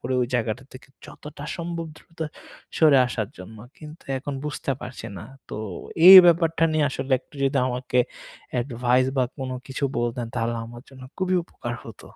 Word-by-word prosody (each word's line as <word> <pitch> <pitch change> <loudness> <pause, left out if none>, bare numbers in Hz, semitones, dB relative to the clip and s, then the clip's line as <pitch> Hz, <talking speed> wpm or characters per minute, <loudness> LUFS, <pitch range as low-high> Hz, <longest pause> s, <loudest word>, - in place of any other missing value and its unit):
করি 130 - -2
ওই - - 0
জায়গাটা 120 +2 -1
থেকে 130 +2 -13 0.2
যতটা 150 -1 -10
সম্ভব 170 -1 -4
দ্রুত 165 +1 -21 0.6
সরে 150 -4 +6
আসার 110 -4 -3
জন্য। 100 +5 -10 0.2
কিন্তু 155 +1 -12
এখন 140 +1 -5
বুঝতে 145 -2 -3
পারছি 125 +1 -8
না। - - -9 0.2
তো - - -6 0.5
এই 190 - +13
ব্যাপারটা 165 -1 +3
নিয়ে 155 -2 +2
আসলে 135 0 -4
একটু 140 - -25
যদি 135 0 +2
আমাকে 125 0 -2 0.5
অ্যাডভাইস 125 +1 +1
বা 130 - +3
কোনো 130 -1 -4
কিছু 135 +1 -3
বলতেন 120 0 -2
তাহলে 115 0 -1
আমার 120 +1 -11
জন্য 130 -1 -14
খুবই 185 -1 0
উপকার 120 -7 -6
হত। 115 - -11
130 Hz, 170 wpm, -24 LUFS, 120-150 Hz, 0.6 s, এই